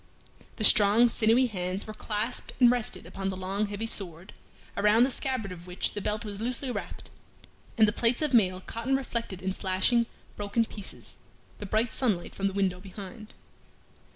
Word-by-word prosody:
The 220 - -4
strong, 215 +3 +6
sinewy 230 +3 +3
hands 185 -4 -3
were 215 - -7
clasped 215 +3 -3
and 245 -2 +7
rested 245 -3 -3
upon 195 0 -4
the 190 - -4
long 195 +3 -1
heavy 205 +2 -4
sword, 185 -5 -4 0.4
around 210 +3 +5
the 265 - +2
scabbard 255 -7 -2
of 175 0 -10
which 180 0 -1
the 205 - -4
belt 210 +3 -2
was 205 0 -6
loosely 250 +2 +1
wrapped, - - -7 0.7
and 220 -1 +7
the - - +3
plates 240 +6 +1
of 295 -3 0
mail 185 -5 +3
caught 230 +5 -6
and 270 0 +3
reflected 230 -8 -5
in 190 0 -1
flashing, 195 +6 +1 0.3
broken 205 +3 0
pieces, 205 -3 -8 0.4
the 205 - -6
bright 220 +4 +1
sunlight 210 -10 0
from 195 - -1
the 195 - -3
window 190 -2 0
behind. 200 +2 -10
210 Hz, 180 wpm, -28 LUFS, 190-235 Hz, 0.7 s, and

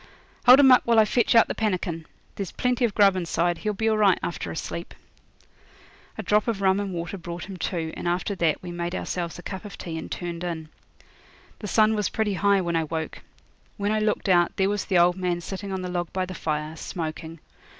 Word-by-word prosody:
'Hold 255 +2 +10
him 270 -2 +7
up 255 - +7
while 235 -1 +2
I 220 - +7
fetch 235 +2 +2
out 230 - +7
the - - -2
pannikin. 180 -6 -2 0.3
There's 195 -4 -5
plenty 250 0 +1
of 215 - -3
grub 200 -2 +5
inside. 175 -1 0
He'll 210 -1 -1
be 220 +3 -1
all 220 -1 +2
right 195 -4 +5
after 170 - -4
a - - -5
sleep.' 170 +1 -6 1.2
A 220 - -4
drop 210 +4 +2
of 225 -4 -1
rum 190 0 +3
and 200 -1 -3
water 175 +2 -5
brought 170 +1 -6
him 195 - -7
to, 165 -2 -3
and - - -5
after 180 +4 0
that 170 -4 0
we 175 - -6
made 175 +1 -3
ourselves 170 -1 -3
a 175 - -10
cup 190 -2 -6
of 205 - -9
tea 165 -2 -5
and - - -8
turned 175 -1 -5
in. 160 -3 -4 0.9
The 210 - -6
sun 215 +2 +4
was 210 -2 0
pretty 215 -2 -1
high 200 +1 +3
when 170 -2 -2
I 165 -1 +1
woke. 160 0 -5 0.6
When 205 +1 -1
I 215 - +1
looked 215 -1 0
out 175 -2 +3
there 190 0 +2
was 205 -1 -1
the 185 - +1
old 175 +1 +4
man 180 -2 -1
sitting 195 +3 -6
on 190 -1 -3
the - - -3
log 175 -2 -3
by 185 -1 -1
the 185 - -7
fire, 155 -2 -3
smoking. 160 -1 -6
185 Hz, 230 wpm, -25 LUFS, 170-205 Hz, 1.2 s, Hold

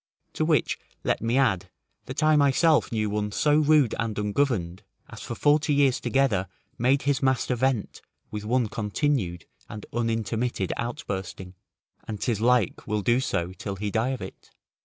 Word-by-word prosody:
To - - -1
which 155 -2 +1 0.2
let - - 0
me 115 +3 +1
add, 105 -10 +1 0.4
that - - -3
I 155 0 +5
myself 150 +2 +3
knew 110 -2 0
one 105 0 -2
so 150 +7 +3
rude 150 -5 +4
and 115 -2 -2
ungoverned, 105 -4 -1 0.3
as - - -11
for 120 - -5
forty 150 +2 +2
years 140 -3 +3
together 120 -9 +1 0.3
made 130 +4 +2
his 140 -2 +1
master 130 -1 +1
vent 125 -2 -1 0.3
with 105 -1 -5
one 120 +2 +1
continued 105 - -1 0.2
and 105 - -8
unintermitted 115 -2 -1
outbursting, 95 -7 -5 0.5
and 105 -2 -5
'tis 115 -3 -1
like 120 -4 +2
will 105 -1 -1
do 120 +4 +3
so 90 -8 -2
till 100 +2 -5
he 105 +1 -3
die 115 +4 +1
of 130 -2 -3
it. - - -11
120 Hz, 160 wpm, -26 LUFS, 105-135 Hz, 0.5 s, I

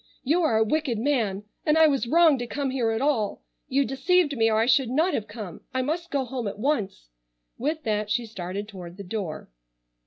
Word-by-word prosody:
You 315 +7 +2
are 270 -10 +2
a 220 - +4
wicked 265 0 0
man 220 -6 0 0.2
and 305 0 +3
I 320 - +7
was 275 -5 +2
wrong 320 -1 +5
to 245 - -4
come 280 +1 -2
here 250 -4 0
at 225 +3 -1
all. 230 -9 0 0.2
You 275 +1 +2
deceived 290 +4 +2
me 225 -2 +3
or 215 - +2
I 225 - +3
should 255 0 +3
not 320 +8 +2
have 215 - -2
come. 205 -6 -8
I 260 - +1
must 335 +5 -2
go 275 -2 0
home 245 -2 -4
at 200 - -5
once." 210 - -2 0.5
With 305 +5 -2
that 210 -3 -1
she 235 +2 0
started 200 -1 -5
toward 180 -4 -10
the 200 - -7
door. 180 - -5
245 Hz, 215 wpm, -26 LUFS, 210-290 Hz, 0.5 s, I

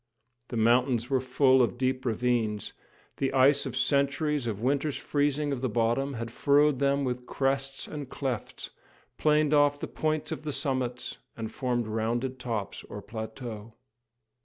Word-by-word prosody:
The 120 - -4
mountains 120 +2 +3
were 130 -2 +3
full 130 0 +4
of 120 0 +1
deep 130 0 0
ravines, 115 -3 0 0.4
the 135 - 0
ice 140 +1 +4
of 125 -1 -5
centuries 140 0 +1
of 105 -3 -2
winters' 140 +4 0
freezing 145 0 0
of 135 -3 -2
the 130 - 0
bottom 120 +5 +1
had 115 0 -5
furrowed 145 +2 +3
them 140 0 +2
with 125 -1 -3
crests 135 0 -1
and 145 -3 -6
clefts, 130 -6 -4 0.5
planed 150 -1 +3
off 145 -1 +4
the - - -4
points 155 -1 -1
of - - -3
the 155 -1 -3
summits, 130 -3 -2 0.2
and 110 -1 -4
formed 125 -4 -1
rounded 120 +4 -2
tops 110 -5 -4
or 105 - -8
plateaux. 110 0 -7
130 Hz, 155 wpm, -28 LUFS, 120-140 Hz, 0.5 s, full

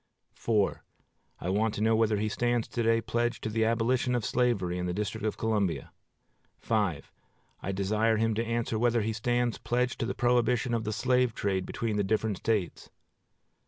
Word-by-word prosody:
I 90 - -3
want 105 +2 +1
to - - -3
know 110 +1 +3
whether 110 -1 +2
he 105 +1 0
stands 120 +1 0
to 120 - -2
day 115 0 +3
pledged 120 +2 -1
to - - -1
the 110 +1 +1
abolition 120 +2 +1
of 120 - -1
slavery 100 -8 +1
in 90 - -2
the 90 - -2
District 105 0 -3
of 110 - -1
Columbia. 105 -6 -1 0.8
I 95 -2 -3
desire 105 +3 +1
him 115 +1 +1
to 115 +2 0
answer 115 -1 -1
whether 120 -1 +2
he 110 +1 -1
stands 120 +1 0
pledged 125 +1 -1
to 115 - -1
the - - -3
prohibition 120 0 +2
of 115 -1 -1
the 110 - -1
slave 125 +1 +1
trade 95 -2 -1
between 110 -3 -2
the 105 - +2
different 110 0 0
States. 105 -5 -2
110 Hz, 175 wpm, -29 LUFS, 105-120 Hz, 0.8 s, know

